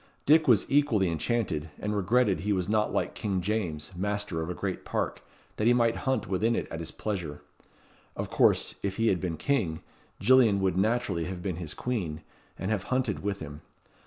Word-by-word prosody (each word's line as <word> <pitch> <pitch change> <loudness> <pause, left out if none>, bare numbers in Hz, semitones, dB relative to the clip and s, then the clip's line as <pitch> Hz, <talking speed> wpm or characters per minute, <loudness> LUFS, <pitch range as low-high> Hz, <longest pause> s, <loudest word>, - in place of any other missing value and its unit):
Dick 155 +2 +5
was 115 -6 +5
equally 125 -10 +3
enchanted, 80 -3 -1
and 105 0 -2
regretted 105 +1 +2
he 105 +2 -1
was 90 -2 -1
not 105 0 +1
like - - -1
King 100 -3 -1
James, 90 -5 -2
master 100 -2 -2
of 80 - -4
a 90 - -3
great 95 -2 -3
park, - - -2 0.4
that 105 - +1
he 120 - +6
might 115 -1 +3
hunt 130 -5 +1
within 110 +5 +1
it - - -2
at 80 - -4
his 85 - -5
pleasure. 90 -9 -4 0.7
Of - - -4
course, - - +3
if 100 -1 -2
he 115 +1 +2
had 90 - +1
been 85 -3 -2
king, 105 - 0 0.4
Gillian 115 -2 +5
would 95 -2 +1
naturally 100 -4 +1
have 90 0 -5
been 90 -4 -2
his 80 -4 -5
queen, 90 -11 -3 0.4
and 95 +4 -3
have 100 -3 -1
hunted 130 -5 0
with 100 0 -3
him. 75 -1 -8
100 Hz, 190 wpm, -28 LUFS, 90-115 Hz, 0.7 s, he